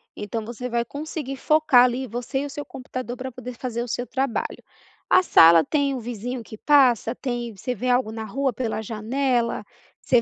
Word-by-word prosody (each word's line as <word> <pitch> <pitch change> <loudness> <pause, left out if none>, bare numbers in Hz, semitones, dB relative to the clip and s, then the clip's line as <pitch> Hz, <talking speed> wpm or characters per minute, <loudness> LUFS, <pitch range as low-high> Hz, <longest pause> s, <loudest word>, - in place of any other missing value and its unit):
Então, 215 +1 -4 0.2
vai 235 0 0
conseguir 285 0 -5
focar 300 -3 +5
ali, 255 +1 -1
você 245 +4 -3
e 285 - -3
o - - -6
seu 290 +1 -6
computador 255 -1 -6
para 260 0 -5
poder 250 0 -8
fazer 240 -2 -3
o - - -7
seu 245 +1 -3
trabalho. 265 -3 -2 0.5
A 370 - +6
sala 165 - +7
tem 285 -2 0
o 260 - -3
vizinho 240 +1 -5
que 220 - -11
passa, 255 -4 +4
tem, 240 -3 -4
você 250 +6 -4
vê 250 +4 -2
algo 245 -3 +2
na 220 0 -5
rua 260 +4 -1
pela 225 -2 -2
janela, 235 +3 -1 0.4
você 245 -2 +3
245 Hz, 190 wpm, -24 LUFS, 230-265 Hz, 0.5 s, sala